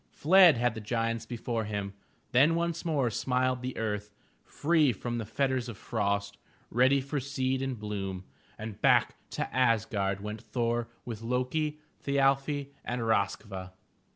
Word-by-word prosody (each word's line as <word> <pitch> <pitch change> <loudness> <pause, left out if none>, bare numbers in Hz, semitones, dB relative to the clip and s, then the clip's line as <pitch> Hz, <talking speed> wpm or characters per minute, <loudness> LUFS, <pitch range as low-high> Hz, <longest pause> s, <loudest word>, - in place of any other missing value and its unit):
Fled 175 -2 +6
had 120 0 +1
the 110 - -6
giants 115 +1 -1
be 120 - -5
fore 115 -1 -2
him. 100 -2 -3 0.4
Then 145 +7 +5
once 170 0 -1
more 145 -8 +1
smiled 125 +2 0
the 130 0 -4
earth, 105 -2 -2 0.3
free 155 -3 +2
from 120 +2 -4
the 110 - -5
fetters 130 +1 0
of 110 - -7
frost, 100 +1 -2 0.3
ready 130 +4 +4
for 140 +2 -2
seed 130 -1 -1
and 135 -2 -2
bloom, 100 -3 -4 0.3
and 110 -2 -7
back - - +4 0.2
to - - -2
Asgard 110 -6 +1
went 105 +2 -6
Thor 120 -1 -1 0.2
with 115 -3 -6
Lo'ki, 130 +6 -1 0.2
Thi 140 0 -1
al'fi 140 +1 +2
and 120 0 -3
RoskVa. 100 -3 -1
120 Hz, 155 wpm, -30 LUFS, 105-135 Hz, 0.4 s, Fled